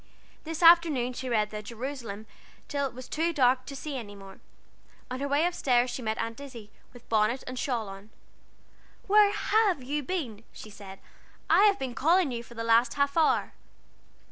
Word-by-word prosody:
This 325 +2 -4
afternoon 325 -7 +5
she 255 +1 -5
read 215 -3 +1
the 210 0 -5
Jerusalem 230 -1 -7 0.4
till 280 -1 -1
It 255 - -12
was 255 0 -9
too 330 +2 0
dark 255 -2 +2
to 275 - -7
see 280 0 -5
any 205 -4 -8
more. 195 -1 -13 0.7
On 255 - -4
her 280 - -2
way 285 +4 +2
up 350 - 0
stairs 250 -5 +1
she 250 - -5
met 220 -1 -2
Aunt 230 +2 -4
Izzie, 240 -7 -10 0.2
with 245 -1 -16
bonnet 220 +3 +1
and 255 0 -6
shawl 235 -6 -2
on. 195 +2 -11 1.0
"Where 415 0 +5
have 410 - +1
you 290 +4 -2
been?" 255 - -4
she 215 - -11
said. 195 -2 -11 0.5
"I 410 - +6
have 405 -1 +4
been 260 -2 -4
calling 330 +4 +2
you 235 -1 -4
for 235 0 -15
the 230 - -4
last 230 +1 +3
half 280 0 0
hour." 320 -2 +2
255 Hz, 190 wpm, -28 LUFS, 230-300 Hz, 1.0 s, I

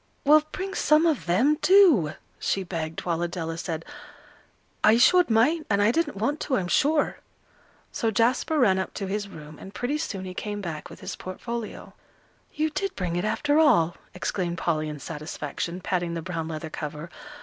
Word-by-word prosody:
"Well, 305 +2 +7
bring 385 +1 -4
some 305 +2 +4
of 310 - +1
them, 260 - +3
do," 330 - +6 0.3
she 195 - 0
begged, 165 -3 -4
while 170 -1 -1
Adela 170 -1 -3
said, 165 -1 -4 1.0
"I 215 +1 +6
showed 355 +8 +5
mine, 265 +9 +3
and 200 -1 +2
I 205 +2 +4
didn't 295 -3 -1
want 280 +9 -1
to, 260 - 0
I'm 180 - -2
sure." 295 - +2 0.7
So 225 - 0
Jasper 240 +8 +1
ran 195 -9 +4
up 190 - -4
to 200 - -3
his 200 +1 -3
room, 150 -4 -11
and 195 - -11
pretty 285 +5 -1
soon 195 -11 -4
he 185 - -6
came 205 +2 -4
back 165 -6 -6
with - - -12
his 185 -1 -5
portfolio. 230 +4 -6 0.6
"You 310 +1 -1
did 390 +5 -3
bring 180 -3 -2
it, 175 - -1
after 290 +7 +2
all," 190 - +4 0.2
exclaimed 180 -1 -2
Polly, 155 -3 -1
in 150 - -6
satisfaction, 155 +3 -5
patting 175 -2 -1
the 165 - -4
brown 165 -2 -4
leather 160 -1 -6
cover. 155 +2 -6
195 Hz, 180 wpm, -26 LUFS, 170-285 Hz, 1.0 s, Well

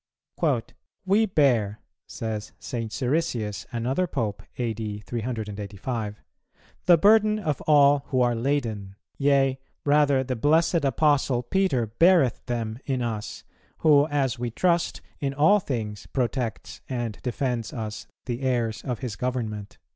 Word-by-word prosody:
"We 205 +4 +3
bear," 120 - +2 0.3
says 110 -2 -5
St. 115 -3 -5
Siricius, 120 -6 -1
another 130 +10 0
Pope 110 -10 -2 0.2
(A.D. 110 -3 -3
385), 105 -1 -4 0.6
"the 175 -1 +8
burden 215 +3 +5
of 155 -10 -2
all 145 -2 +5
who 130 -3 0
are 120 -1 +3
laden; 115 -6 -2 0.2
yea, 135 -2 +3 0.3
rather 145 -2 +4
the 130 -1 -3
blessed 160 +6 +2
Apostle 140 -3 +2
Peter 160 -5 +1
beareth 150 - +3
them 115 -2 -3
in 130 -3 0
us, 110 -3 -4 0.4
who, 145 -1 +6
as 135 -4 0
we 120 0 -2
trust, 170 +7 0 0.2
in 140 -1 -2
all 160 +9 +5
things 110 - -4
protects 125 -2 -3
and 120 -5 -3
defends 125 -2 -2
us 110 -2 -6 0.2
the 120 0 -3
heirs 120 -4 0
of 125 -4 -4
his 120 -6 -4
government." 110 -4 -4
125 Hz, 125 wpm, -25 LUFS, 110-145 Hz, 0.6 s, the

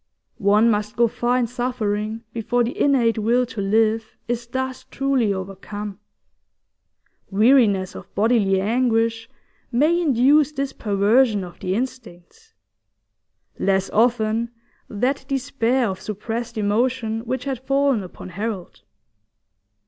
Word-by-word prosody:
One 210 +4 +4
must 210 0 -2
go 235 0 +4
far 240 +2 0
in 250 - +2
suffering 225 -3 -2
before 235 +2 0
the 235 - -3
innate 240 -5 +2
will 240 +4 +2
to 225 -3 -6
live 220 +2 +1
is 240 0 -3
thus 260 +1 -4
truly 270 -6 +1
overcome; 195 +1 -6 1.3
weariness 210 -3 +3
of - - -11
bodily 205 -3 +3
anguish 225 +1 +1 0.4
may 305 +8 +3
induce 290 +1 +4
this 275 -1 -3
perversion 210 +1 +2
of 175 -1 -10
the 185 +1 -2
instincts; 250 - -7 1.0
less 195 0 +1
often, 230 0 +2 0.4
that 255 +6 -1
despair 260 -2 0
of 190 -1 -4
suppressed 225 +3 -5
emotion 225 +2 0
which 255 +2 -2
had 270 -3 -3
fallen 275 -2 +1
upon 185 0 -10
Harold. 200 0 -5
230 Hz, 120 wpm, -22 LUFS, 210-255 Hz, 1.3 s, One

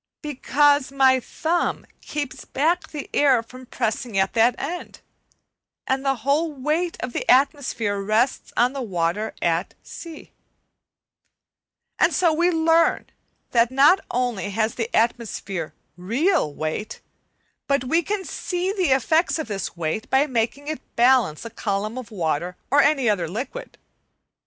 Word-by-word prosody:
Because 290 -1 +2
my 265 -1 +4
thumb 330 +7 -2 0.2
keeps 290 -3 -5
back 330 +6 0
the 295 -3 -6
air 265 -5 +4
from 255 +2 -13
pressing 225 -2 -2
at 190 0 +1
that 235 +1 +4
end, 345 +6 -6 0.9
and 265 +1 -1
the 270 -1 +1
whole 305 +4 +2
weight 305 +5 -1
of 240 - -4
the - - -4
atmosphere 255 -6 +2
rests 220 +6 0
on 245 +2 +3
the 275 - -4
water 190 -1 -2
at 170 +2 0
the 340 - -9
other 320 - -9
end. - - -14 1.7
And - - +4
so 345 -3 +3
we 340 +3 +2
learn 325 0 +2 0.4
that 230 -1 +3
not 280 +8 +5
only 240 -5 -1
has 220 +2 0
the 230 -1 -3
atmosphere 215 -7 -1 0.2
real 240 - +1
weight, 155 +9 -4 0.7
but 280 -2 +1
we 325 +7 +2
can 395 +2 -3
see 365 +1 -2
the 370 -6 0
effects 315 +7 +2
of 315 - -4
this 195 -4 -4
weight 165 +6 -3
by 270 +2 +4
making 260 +2 -2
it 310 0 -4
balance 240 -9 +3
a 230 - -7
column 215 +2 -3
of 240 -3 -9
water 175 -3 -2
or 285 - +6
any 280 -4 +2
other 190 -6 +1
liquid. 255 - -6
255 Hz, 145 wpm, -23 LUFS, 215-300 Hz, 1.7 s, or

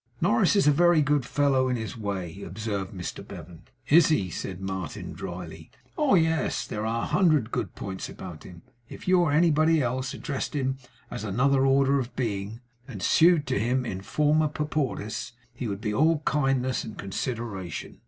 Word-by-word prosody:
'Norris 120 - +3
is 200 - +4
a 150 - +6
very 170 +1 +4
good 145 -3 +1
fellow 135 -1 +2
in 125 - +1
his 110 0 -5
way,' 100 -4 -4
observed 100 0 -4
Mr 90 -3 -6
Bevan. 85 -2 -10 0.3
'Is 165 +2 +6
he?' 100 - +1
said 95 -1 -5
Martin 95 -4 -5
drily. 85 -3 -8 0.3
'Oh 295 -8 +3
yes! 160 -2 +1
there 105 +1 -3
are 115 +1 -1
a - - 0
hundred 155 - +2
good - - -3
points 95 -2 -6
about 85 -5 -9
him. 85 -2 -12 0.3
If - - -11
you 185 0 +5
or 170 -4 +2
anybody 160 +1 +4
else 130 0 -2
addressed 140 +1 -4
him 135 -1 -1 0.3
as - - -5
another 135 +6 +2
order 135 +1 +3
of 125 -1 -5
being, 110 -1 -3 0.3
and 100 - -7
sued 165 -2 +5
to - - 0
him 125 +4 0
IN 95 -4 -4
FORMA 150 +7 +2
PAUPERIS, 145 -8 -3 0.2
he 120 0 -5
would 100 -1 -4
be 105 -3 -2
all 155 +5 +2
kindness 135 -3 +1
and 110 - -8
consideration. 100 - -5
125 Hz, 175 wpm, -26 LUFS, 100-150 Hz, 0.3 s, a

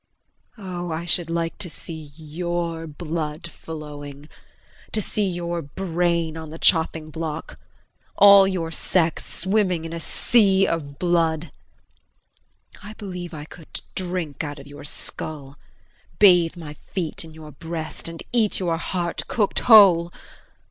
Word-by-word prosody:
Oh, 180 -4 -5
I 160 +2 -3
should 170 0 +1
like 165 0 -2
to 175 - -2
see 160 -2 -8
your 165 +1 -3
blood 155 +1 -4
flowing 145 -2 -9 0.6
to 220 - +1
see 210 -1 -1
your 175 -1 -3
brain 170 0 -1
on 160 -1 -7
the 160 - -8
chopping 160 -2 +2
block, 160 -1 -5 0.6
all 200 -1 +8
your 175 -4 -2
sex 165 0 +1
swimming 190 -3 0
in 165 - -6
a 170 - -4
sea 195 +1 +3
of 140 -4 -3
blood. 165 -2 +1 1.3
I 205 +1 -9
believe 180 -5 -6
I 150 -1 -7
could 160 0 -9
drink 175 -5 -3
out 145 -1 -5
of 140 - -11
your 145 0 -11
skull, 145 -1 -5 0.6
bathe 175 -4 +6
my 155 -3 -7
feet 170 +1 -5
in 160 -1 -12
your 155 -1 -10
breast 160 +1 -5
and 165 0 -7
eat 225 -4 +2
your 170 -3 0
heart 175 0 -2
cooked 210 -4 +1
whole. 190 -7 +7
165 Hz, 135 wpm, -23 LUFS, 155-180 Hz, 1.3 s, all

